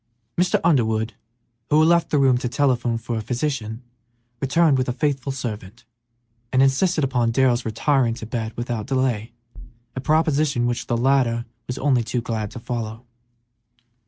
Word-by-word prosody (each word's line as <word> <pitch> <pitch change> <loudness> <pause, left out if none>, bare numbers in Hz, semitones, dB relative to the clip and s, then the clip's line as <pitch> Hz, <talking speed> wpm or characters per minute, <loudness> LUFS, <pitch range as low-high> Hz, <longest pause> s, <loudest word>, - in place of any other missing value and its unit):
Mr. 180 +1 +2
Underwood, 110 -9 +2 0.6
who 150 - +4
had 155 - +5
left 170 -1 +3
the 150 - +1
room 135 -2 +4
to 125 - -2
telephone 125 -3 +1
for 115 0 -4
a - - -2
physician, 120 -2 -3 0.6
returned 145 0 +3
with 130 - 0
a - - 0
faithful 135 0 -1
servant, 115 -4 -6 0.7
and 130 +1 +4
insisted 155 +4 +2
upon 125 -3 +1
Darrell's 125 0 +2
retiring 115 +1 +1
to 115 - -7
bed 110 -1 -3
without 120 -2 -3
delay, 130 -5 0 0.6
a 130 - -3
proposition 150 -4 +2
which 120 0 -2
the 120 - 0
latter 120 -2 +2 0.2
was 125 - -4
only 135 -3 +2
too 110 +3 -2
glad 110 -3 -3
to 120 - -9
follow. 115 -1 -5
125 Hz, 160 wpm, -22 LUFS, 115-140 Hz, 0.7 s, had